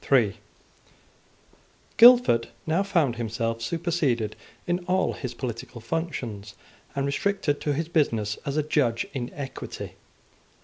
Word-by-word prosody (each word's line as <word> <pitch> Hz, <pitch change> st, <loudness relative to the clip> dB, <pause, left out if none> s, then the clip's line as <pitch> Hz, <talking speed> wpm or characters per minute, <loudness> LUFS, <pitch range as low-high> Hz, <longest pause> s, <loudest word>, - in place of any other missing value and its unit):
Guildford 235 Hz, -, +7 dB, 0.2 s
now 165 Hz, +4 st, +2 dB
found 170 Hz, -, +1 dB
himself 115 Hz, 0 st, -2 dB
superseded 135 Hz, -6 st, 0 dB, 0.3 s
in 175 Hz, 0 st, 0 dB
all 185 Hz, +1 st, +1 dB
his 125 Hz, -4 st, -6 dB
political 120 Hz, -1 st, -5 dB
functions, 115 Hz, -, -4 dB, 0.4 s
and 140 Hz, 0 st, 0 dB
restricted 145 Hz, +1 st, 0 dB
to 145 Hz, -, 0 dB
his 160 Hz, +3 st, -2 dB
business 115 Hz, -11 st, 0 dB
as 140 Hz, +1 st, -3 dB
a 155 Hz, -, +2 dB
judge 135 Hz, -6 st, +1 dB
in 125 Hz, -2 st, -4 dB
equity. 135 Hz, -2 st, -7 dB
140 Hz, 115 wpm, -26 LUFS, 115-165 Hz, 0.4 s, Guildford